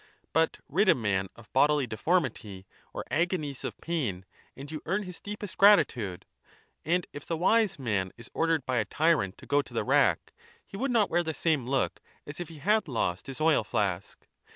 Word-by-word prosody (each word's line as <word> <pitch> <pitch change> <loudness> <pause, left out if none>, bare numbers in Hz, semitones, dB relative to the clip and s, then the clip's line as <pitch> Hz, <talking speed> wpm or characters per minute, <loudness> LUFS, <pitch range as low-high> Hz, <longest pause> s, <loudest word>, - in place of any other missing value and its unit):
But 160 +2 +2
rid 190 +7 +2
a - - +7
man 95 -5 0
of 115 -2 -17
bodily 145 +1 +4
deformity 110 - -1 0.3
or - - -6
agonies 155 -4 -1
of - - -5
pain, 125 - -2 0.3
and 140 +2 -9
you 155 - -5
earn 195 +5 0
his 180 -3 -9
deepest 205 -2 -7
gratitude; 125 - +4 0.6
and 175 +3 +1
if 145 - -7
the 165 - -3
Wise 215 +4 +3
Man 105 -8 -1
is 115 - -11
ordered 165 -4 +1
bya 125 -4 +1
tyrant 150 - +1
togo 145 0 +1
to 140 - -14
the - - +1
rack, - - +2 0.3
he - - -12
would 265 +7 -1
not 225 -5 +2
wear 175 - +3
the 160 -2 -3
same 155 -7 0
look 135 0 0 0.3
as 145 - -9
if 175 -2 -5
he 165 - -11
had 210 +8 +1
lost 105 -8 -2
his 135 +1 -7
oil 155 -6 +3
flask. 100 -3 -2
150 Hz, 185 wpm, -28 LUFS, 115-175 Hz, 0.6 s, a